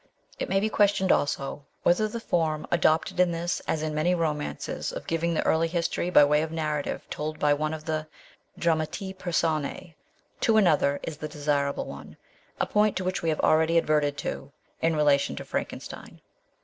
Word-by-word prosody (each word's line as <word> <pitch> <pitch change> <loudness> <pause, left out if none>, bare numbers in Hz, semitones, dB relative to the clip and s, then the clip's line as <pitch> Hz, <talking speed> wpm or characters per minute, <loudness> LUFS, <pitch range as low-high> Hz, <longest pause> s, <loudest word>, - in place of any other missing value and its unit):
It - - -3
may 195 - +3
be 210 - +1
questioned, 205 -3 +3
also, 140 0 0 0.2
whether 195 +5 +3
the 230 +2 -5
form 160 -7 0
adopted 170 +2 +2
in 180 -1 +5
this 170 +1 -2
as 155 - -1
in 155 -1 -2
many 165 +4 +2
romances 150 -3 -2
of - - -7
giving 165 +1 0
the - - 0
early 165 +1 +3
history 170 +1 -1
by 165 - +7
way 150 +1 +3
of 160 0 -3
narrative 155 -3 -3
told 155 +1 -4
by 150 -1 +3
one 155 +1 -1
of 155 -1 -6
the 155 -1 -2 0.5
dramatis 170 +3 -1
persona 165 -2 -1 0.5
to 225 -1 +3
another, 145 -8 +3
is 160 - -5
the 155 - -5
desirable 145 -1 -1
one - - -10 0.4
a - - +2
point 210 -1 +2
to 185 - -2
which 185 +1 -1
we 165 - 0
have 155 - 0
already 160 +1 +3
adverted 150 -3 +1
in 150 +4 -4
rela 145 -2 +4
tion 140 - -3
to - - -7
Frankenstein. - - -6
160 Hz, 180 wpm, -27 LUFS, 150-175 Hz, 0.5 s, by